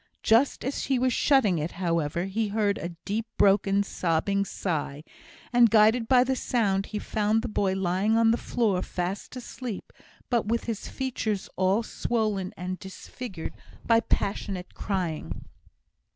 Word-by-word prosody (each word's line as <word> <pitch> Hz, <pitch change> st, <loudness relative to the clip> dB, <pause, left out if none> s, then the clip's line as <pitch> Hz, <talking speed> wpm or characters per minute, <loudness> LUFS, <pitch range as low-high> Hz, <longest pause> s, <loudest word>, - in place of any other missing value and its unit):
Just 235 Hz, +5 st, +3 dB
as 270 Hz, -, -2 dB
he 270 Hz, -, +1 dB
was 255 Hz, 0 st, +2 dB
shutting 225 Hz, -, +3 dB
it, 155 Hz, +3 st, -3 dB
however, 170 Hz, -1 st, -1 dB
he 210 Hz, +3 st, -1 dB
heard 205 Hz, -1 st, 0 dB
a 170 Hz, +2 st, -5 dB
deep, 220 Hz, +3 st, -2 dB
broken, 195 Hz, 0 st, +4 dB
sobbing 195 Hz, +2 st, 0 dB
sigh; 150 Hz, -7 st, -3 dB, 0.5 s
and, 240 Hz, -1 st, +6 dB
guided 225 Hz, +2 st, +4 dB
by 250 Hz, -1 st, +6 dB
the 265 Hz, +1 st, 0 dB
sound, 200 Hz, -7 st, 0 dB
he 210 Hz, -, -4 dB
found 215 Hz, +1 st, 0 dB
the -, -, -2 dB
boy 200 Hz, -3 st, 0 dB
lying 190 Hz, +4 st, +1 dB
on 230 Hz, 0 st, +5 dB
the 230 Hz, -, +2 dB
floor, 210 Hz, -8 st, 0 dB
fast 185 Hz, +7 st, -4 dB
asleep, 250 Hz, -3 st, -7 dB, 0.3 s
but 235 Hz, -4 st, 0 dB
with 230 Hz, +1 st, 0 dB
his 225 Hz, -3 st, -4 dB
features 225 Hz, -6 st, -3 dB
all 190 Hz, +4 st, +2 dB
swollen 215 Hz, -5 st, -1 dB
and 185 Hz, +1 st, -4 dB
disfigured 190 Hz, -1 st, -7 dB, 0.3 s
by 230 Hz, -1 st, +5 dB
passionate 195 Hz, -4 st, -2 dB
crying. 180 Hz, -6 st, -3 dB
205 Hz, 150 wpm, -27 LUFS, 185-230 Hz, 0.5 s, and